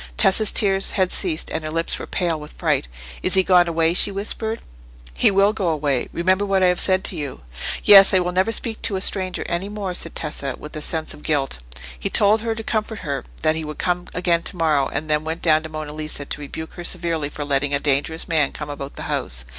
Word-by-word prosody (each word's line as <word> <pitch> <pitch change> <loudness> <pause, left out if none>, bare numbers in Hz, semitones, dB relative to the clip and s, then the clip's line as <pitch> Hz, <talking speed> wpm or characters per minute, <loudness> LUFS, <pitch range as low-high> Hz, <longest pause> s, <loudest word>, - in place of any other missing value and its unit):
Tessa's 210 +2 +3
tears 195 -2 +2
had 185 -2 +1
ceased, 165 -5 +2
and 160 - -3
her 155 - -4
lips 165 +1 -1
were - - -7
pale 170 -4 -1
with 150 0 -10
fright. - - 0 0.3
"Is - - +3
he 190 - +5
gone 180 -2 +4
away?" 165 0 +1
she 185 - +5
whispered. 220 +3 -3 0.5
"He - - +3
will 200 +1 +3
go 195 -5 -1
away. 145 -5 -1
Remember 185 +3 +1
what 195 -2 +1
I 180 -1 +5
have - - -2
said 190 0 +2
to 190 - +2
you." 145 -4 -6 0.4
"Yes; 195 -1 +9
I 190 - +4
will 180 -1 0
never 185 +5 +1
speak 225 -1 -3
to 200 - 0
a - - -1
stranger 185 -2 +1
any 175 +4 -2
more," 205 -3 -4
said 170 -2 -1
Tessa, 140 -2 -3
with 150 - -10
a 155 - -5
sense 160 +1 -1
of - - -14
guilt. 140 - -1 0.4
He - - -2
told 215 +1 +4
her, 225 0 -2
to 225 - -6
comfort 215 -1 -2
her, 140 -2 -3 0.2
that 155 0 +3
he 160 - -3
would 150 0 -7
come 180 0 -1
again 175 -2 +1
to 180 - -4
morrow; 155 -4 +2
and 155 - -3
then 150 0 0
went 160 +2 -5
down 155 -2 +4
to 160 - -8
Monna 155 -1 -6
Lisa 155 -2 -4
to 150 - -4
rebuke 160 +3 -7
her 175 - -8
severely 170 -4 -1
for 150 0 -6
letting 140 0 0
a - - 0
dangerous 145 +3 -1
man 155 -4 +1
come 150 -1 -6
about 140 -1 -7
the - - -7
house. - - -2
165 Hz, 240 wpm, -21 LUFS, 150-190 Hz, 0.5 s, Yes